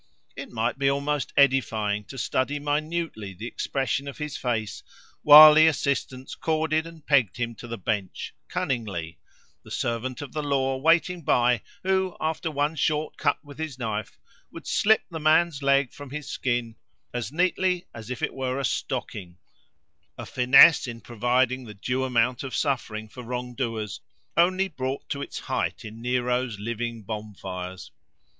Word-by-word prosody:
It -, -, -7 dB
might 120 Hz, +2 st, -1 dB
be 135 Hz, -1 st, +3 dB
almost 140 Hz, +1 st, -1 dB
edifying 110 Hz, -7 st, +2 dB
to 135 Hz, -, -10 dB
study 130 Hz, +5 st, -1 dB
minutely 145 Hz, -, -3 dB
the 105 Hz, +6 st, -7 dB
expression 135 Hz, +2 st, -2 dB
of 140 Hz, -, -7 dB
his 150 Hz, -2 st, -5 dB
face, 110 Hz, -5 st, -2 dB, 0.4 s
while 150 Hz, +1 st, +11 dB
the 155 Hz, +1 st, +7 dB
assistants 135 Hz, -3 st, -1 dB
corded 160 Hz, 0 st, 0 dB
and 165 Hz, -2 st, -13 dB
pegged 130 Hz, -9 st, +3 dB
him 120 Hz, -1 st, -2 dB
to 120 Hz, -, -9 dB
the 115 Hz, 0 st, -5 dB
bench, 100 Hz, -1 st, -3 dB
cunningly; 95 Hz, -, -3 dB, 0.4 s
the -, -, -15 dB
servant 120 Hz, +3 st, -3 dB
of 140 Hz, -, -10 dB
the 155 Hz, -, -2 dB
law 135 Hz, -2 st, 0 dB
waiting 165 Hz, +4 st, +2 dB
by, 125 Hz, -4 st, +2 dB, 0.2 s
who, 190 Hz, -1 st, 0 dB
after 160 Hz, +1 st, -2 dB
one 145 Hz, +1 st, -1 dB
short 150 Hz, +1 st, 0 dB
cut -, -, 0 dB
with 145 Hz, +1 st, -12 dB
his 155 Hz, -5 st, -4 dB
knife, 110 Hz, -4 st, -4 dB, 0.3 s
would -, -, -10 dB
slip 220 Hz, +1 st, +3 dB
the 160 Hz, -, -4 dB
man's 155 Hz, -1 st, +3 dB
leg 140 Hz, -2 st, +2 dB
from 145 Hz, -1 st, -10 dB
his 150 Hz, +2 st, -6 dB
skin, 120 Hz, -3 st, -2 dB, 0.4 s
as 120 Hz, -2 st, -3 dB
neatly 180 Hz, +2 st, +1 dB
as 115 Hz, 0 st, -9 dB
if 125 Hz, -, -5 dB
it -, -, -1 dB
were 130 Hz, -1 st, -2 dB
a 140 Hz, -, -1 dB
stocking—a 90 Hz, -6 st, -7 dB
finesse 130 Hz, +5 st, +6 dB
in 115 Hz, -1 st, -6 dB
providing 125 Hz, +2 st, 0 dB
the 105 Hz, -2 st, -10 dB
due 125 Hz, +6 st, -2 dB
amount 125 Hz, -1 st, +1 dB
of 135 Hz, -2 st, -5 dB
suffering 115 Hz, -6 st, -2 dB
for 125 Hz, +4 st, -10 dB
wrong 125 Hz, +1 st, -5 dB
doers 115 Hz, -5 st, -3 dB, 0.4 s
only 185 Hz, +3 st, +3 dB
brought 135 Hz, -5 st, -4 dB
to 140 Hz, -, -3 dB
its -, -, -6 dB
height -, -, -2 dB
in 110 Hz, +1 st, -9 dB
Nero's 125 Hz, -1 st, 0 dB
living 115 Hz, +1 st, -4 dB
bonfires. 95 Hz, -3 st, -7 dB
130 Hz, 160 wpm, -26 LUFS, 115-150 Hz, 0.4 s, while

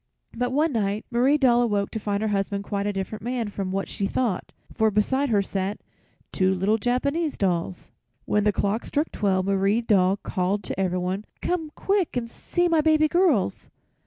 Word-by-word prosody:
But 245 Hz, +1 st, 0 dB
one 300 Hz, +4 st, +2 dB
night 210 Hz, -3 st, -1 dB
Marie 255 Hz, +5 st, +3 dB
Doll 245 Hz, -4 st, +4 dB
awoke 205 Hz, -4 st, 0 dB
to 220 Hz, -, -3 dB
find 205 Hz, 0 st, -2 dB
her 220 Hz, -, 0 dB
husband 200 Hz, 0 st, -1 dB
quite 200 Hz, 0 st, -2 dB
a -, -, +1 dB
different 195 Hz, +2 st, -4 dB
man 240 Hz, -2 st, -2 dB
from 195 Hz, -2 st, -4 dB
what 195 Hz, +1 st, -2 dB
she 200 Hz, -, -2 dB
thought, 230 Hz, -7 st, -1 dB, 0.2 s
for 220 Hz, 0 st, +2 dB
beside 260 Hz, +7 st, +1 dB
her 205 Hz, -3 st, +3 dB
sat 195 Hz, +1 st, -3 dB, 0.5 s
two 190 Hz, -1 st, +2 dB
little 205 Hz, +4 st, +1 dB
Japanese 280 Hz, +8 st, 0 dB
dolls. 180 Hz, -2 st, -2 dB, 0.3 s
When 210 Hz, -, +1 dB
the 210 Hz, -, +3 dB
clock 205 Hz, +3 st, -1 dB
struck 300 Hz, +3 st, -1 dB
twelve 190 Hz, -2 st, 0 dB
Marie 200 Hz, +3 st, +2 dB
Doll 195 Hz, -4 st, +3 dB
called 190 Hz, +1 st, -2 dB
to 185 Hz, -, -5 dB
everyone: 185 Hz, +2 st, -1 dB, 0.2 s
"Come 340 Hz, -3 st, -1 dB
quick 390 Hz, -9 st, 0 dB
and 235 Hz, -1 st, -2 dB
see 350 Hz, 0 st, -1 dB
my 330 Hz, -2 st, +3 dB
baby 310 Hz, 0 st, +4 dB
girls!" 310 Hz, -, +1 dB
210 Hz, 185 wpm, -25 LUFS, 195-255 Hz, 0.5 s, Doll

